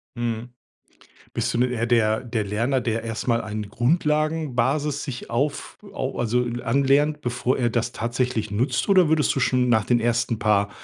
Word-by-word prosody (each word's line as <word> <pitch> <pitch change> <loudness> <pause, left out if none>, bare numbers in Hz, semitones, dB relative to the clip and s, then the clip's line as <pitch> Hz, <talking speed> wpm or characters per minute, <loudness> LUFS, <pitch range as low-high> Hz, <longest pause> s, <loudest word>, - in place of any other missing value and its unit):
Mhm. 120 0 -3 0.9
Bist - - -1
du - - -1
'n 125 +1 +2
eher 115 -1 -1
der 110 -2 +2
der 115 -3 -2
Lerner, 115 +6 0
der 115 -1 -2
erst 115 +2 -4
mal 115 0 +2
eine 105 -1 -5
Grundlagenbasis 150 +1 0
sich 130 -4 -6
auf 140 +5 -2
au - - -4
also, 120 +1 +1
äh, 120 0 -4
anlernt, 140 +4 +2
bevor 125 0 -1
er 120 -2 +2
das 120 +1 -1
tatsächlich 120 -1 -2
nutzt? 125 - 0
Oder 185 -4 +5
würdest 155 -1 +2
du 135 - -1
schon 125 0 +2
nach 110 -3 +3
den 120 +1 +2
ersten 120 -1 0
paar, 100 -1 +2
120 Hz, 175 wpm, -23 LUFS, 115-135 Hz, 0.9 s, Oder